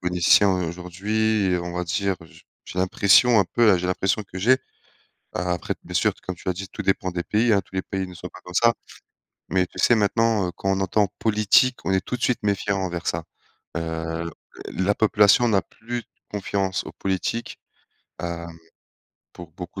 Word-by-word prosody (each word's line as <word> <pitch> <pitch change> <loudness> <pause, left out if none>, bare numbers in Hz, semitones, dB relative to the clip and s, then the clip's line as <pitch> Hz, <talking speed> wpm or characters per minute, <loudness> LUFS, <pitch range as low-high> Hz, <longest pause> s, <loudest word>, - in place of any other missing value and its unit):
politiciens 90 +3 +4
aujourd'hui, 100 +5 -1
heu, 90 - -1
on 85 0 -5
va 90 0 -2
dire, 95 +2 -1
j 80 - -17 0.2
j'ai 90 - -7
l'impression 100 +5 +5
un - - +2
peu, 115 +4 +3
heu, 90 - +3
j'ai 90 - -2
l'impression 95 +3 0
que 95 -2 -9
j'ai, 125 +7 +4 0.8
a 90 0 -1
après 90 - -2
t - - -37
bien - - -9
sûr, - - +3
comme 95 - -4
tu 85 - -8
as 95 - +3
dit, 95 +2 -6
tout - - -6
dépend 95 -1 0
des 85 0 -3
pays, 110 +5 +2
hein, 100 - +4
tous 95 - -21
les 95 - 0
pays 95 0 -3
ne 90 - -11
sont - - -8
pas - - -14
comme 90 - -10
ça. 115 +4 +4 0.8
Mais 95 -1 +2
tu - - -16
sais, 120 - +5
maintenant, 110 -1 +2
heu, - - -3
quand 95 - -2
on 95 - 0
entend: 100 +2 +2
«politique», 110 +4 +3
on - - 0
est 95 0 +2
tout 125 - -3
de - - -17
suite 125 - +1
méfiant 100 -1 0
envers 85 -3 -3
ça. 85 0 -1 0.5
Heu, 80 0 -3 0.4
l 95 - -2
la 100 - +2
population 105 +2 +4
n'a 100 -3 +3
plus 115 +6 -7 0.3
confiance 95 -2 -1
aux - - -7
politiques, 95 +5 -3 0.6
hem, 85 -1 -5 0.8
pour 85 -2 -11
beaucoup 90 +1 -8
95 Hz, 205 wpm, -24 LUFS, 90-105 Hz, 0.8 s, l'impression